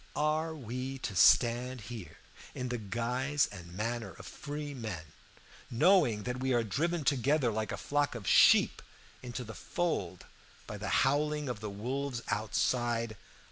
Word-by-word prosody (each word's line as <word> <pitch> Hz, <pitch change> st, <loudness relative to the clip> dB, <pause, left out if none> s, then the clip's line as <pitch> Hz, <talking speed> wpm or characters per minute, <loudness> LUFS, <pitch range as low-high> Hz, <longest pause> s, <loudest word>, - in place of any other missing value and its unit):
Are 155 Hz, +2 st, 0 dB
we 130 Hz, 0 st, -5 dB
to 100 Hz, -, -4 dB
stand 125 Hz, +4 st, +4 dB
here 105 Hz, -6 st, -8 dB, 0.4 s
in 125 Hz, -1 st, -3 dB
the 125 Hz, -1 st, -2 dB
guise 125 Hz, +7 st, 0 dB
and 90 Hz, -4 st, -10 dB
manner 115 Hz, +5 st, -3 dB
of -, -, -11 dB
free 145 Hz, 0 st, -6 dB
men, 110 Hz, -, -5 dB, 0.7 s
knowing 125 Hz, -, +4 dB
that 125 Hz, +2 st, -3 dB
we 130 Hz, -1 st, +1 dB
are 120 Hz, -, +2 dB
driven 160 Hz, -, -1 dB
together 140 Hz, -1 st, +2 dB
like 110 Hz, -1 st, -2 dB
a 100 Hz, -, -3 dB
flock 145 Hz, +8 st, 0 dB
of 110 Hz, -5 st, -7 dB
sheep -, -, +6 dB, 0.4 s
into 125 Hz, 0 st, -5 dB
the 110 Hz, -1 st, -8 dB
fold 100 Hz, -, -3 dB, 0.4 s
by -, -, -7 dB
the -, -, -3 dB, 0.2 s
howling 150 Hz, +2 st, +1 dB
of 125 Hz, -4 st, -3 dB
the 105 Hz, 0 st, -5 dB
wolves 125 Hz, +4 st, -3 dB
outside? 115 Hz, +1 st, 0 dB
125 Hz, 150 wpm, -31 LUFS, 110-145 Hz, 0.7 s, sheep